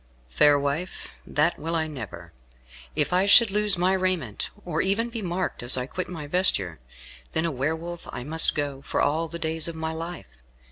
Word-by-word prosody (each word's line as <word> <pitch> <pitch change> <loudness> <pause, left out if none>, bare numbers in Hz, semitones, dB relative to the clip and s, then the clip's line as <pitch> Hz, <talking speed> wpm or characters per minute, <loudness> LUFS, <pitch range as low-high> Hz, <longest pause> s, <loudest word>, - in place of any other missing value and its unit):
"Fair 145 - +5
wife, 145 +6 -3 0.2
that 155 +4 +1
will 165 +2 -3
I 160 -1 +1
never. 95 - -8 0.6
If - - 0
I 185 +2 +3
should 215 +1 +8
lose 210 -1 +5
my 180 +2 +2
raiment, 185 - -1 0.2
or 165 -2 -1
even 225 +5 0
be 230 -1 -5
marked 180 0 -3
as 120 +2 +3
I 125 - -2
quit 185 +7 -5
my 165 -4 -6
vesture, 145 - +1 0.5
then 160 - 0
a 165 - 0
Were 140 +4 -1
Wolf 170 +1 -8
I 120 - -6
must 160 +4 +4
go 145 -2 -3
for - - -3
all 160 +3 +1
the 170 +1 -6
days 160 -1 -2
of 170 - -5
my 160 0 -3
life. 165 +1 -6
160 Hz, 195 wpm, -25 LUFS, 145-180 Hz, 0.6 s, should